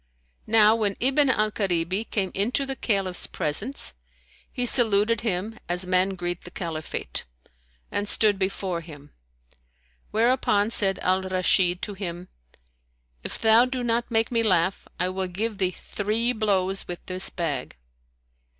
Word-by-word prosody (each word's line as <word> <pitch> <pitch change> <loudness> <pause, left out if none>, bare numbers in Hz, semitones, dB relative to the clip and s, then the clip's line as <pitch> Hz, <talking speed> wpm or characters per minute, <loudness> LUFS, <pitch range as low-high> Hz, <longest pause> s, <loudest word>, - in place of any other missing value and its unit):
Now 220 0 +5
when 210 -3 -1
Ibn 270 +2 +3
al 215 -4 +1
Karibi 190 +1 -1
came 195 -3 -1
into 235 +8 0
the 270 0 -3
Caliph's 195 -7 -2
presence 205 - +1 0.6
he 250 - -2
saluted 230 -2 +5
him 215 0 -3
as 180 +1 +3
men 185 +1 +1
greet 175 -1 -3
the - - -9
Caliphate, 165 -4 -5 0.7
and 205 0 -2
stood 210 -3 +2
before 190 -2 -2
him; 145 -3 -13 1.0
whereupon 220 -2 +2
said 195 -4 +3
Al 185 +1 +2
Rashid 185 -1 +1
to 205 - -3
him, 180 -2 -6 0.9
"If - - -5
thou 225 +2 +5
do 255 -1 -4
not 235 0 0
make 225 -1 +1
me 230 -1 +2
laugh, 185 -3 +1
I 180 - +1
will 190 0 -3
give 205 +3 -3
thee 185 -2 +2
three 215 +6 -2
blows 195 -4 0
with 175 -1 -7
this 185 +1 -5
bag." 145 - -4
195 Hz, 140 wpm, -25 LUFS, 180-225 Hz, 1.0 s, Now